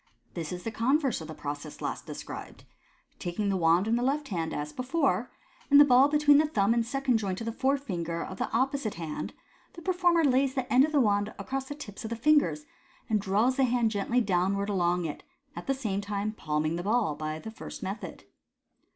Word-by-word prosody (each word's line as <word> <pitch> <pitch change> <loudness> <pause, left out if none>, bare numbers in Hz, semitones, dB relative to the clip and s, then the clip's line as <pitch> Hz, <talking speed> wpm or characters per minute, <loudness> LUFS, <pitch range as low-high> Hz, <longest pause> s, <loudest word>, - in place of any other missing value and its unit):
— - - -40
This 165 -3 -5
is 180 0 -6
the 225 - -3
con 240 +6 +2
verse 270 - -1
of 160 - -7
the 155 - -8
process 145 0 -6
last - - -4
de - - -6
scribed. - - -8 0.6
Taking 185 +4 -2
the 195 - +1
wand 170 +2 +3
in 230 +1 +2
the - - -1
left 280 +3 0
hand, 165 -5 -2
as 150 0 -4
before, 265 +6 0 0.4
and 285 0 +8
the 290 - +9
ball 260 0 +6
between 295 -1 +5
the 310 - +3
thumb 210 -6 +2
and 235 0 +2
second 265 0 +1
joint 190 -3 -3
of 230 - -5
the 230 - -2
forefinger 210 - -1
of - - -8
the - - +1
oppo 270 +4 0
site 215 -6 -4
hand, 165 -2 -5 0.4
the 340 - -10
performer 350 -2 +3
lays 265 0 +2
the 260 -2 -1
end 255 +2 +7
of 310 - -5
the 295 - +3
wand 205 -3 +2
across 270 0 -4
the 290 - -7
tips 205 -9 -9
of 220 - -4
the 230 - -2
fingers, 300 +4 +2 0.5
and 215 -2 +2
draws 215 +6 +1
the 270 - +3
hand 240 -2 +1
gently 225 +4 +1
downwards 200 0 0
along 175 -2 +1
it, 155 - -5 0.3
at 175 - -8
the 270 - +1
same 210 -7 -2
time 205 +1 -2
palming 155 -4 -2
the - - -3
ball 215 -4 +1
by 155 +1 -4
the 220 +7 -8
first 220 - -9
method. 195 +3 -6
220 Hz, 225 wpm, -28 LUFS, 180-270 Hz, 0.6 s, the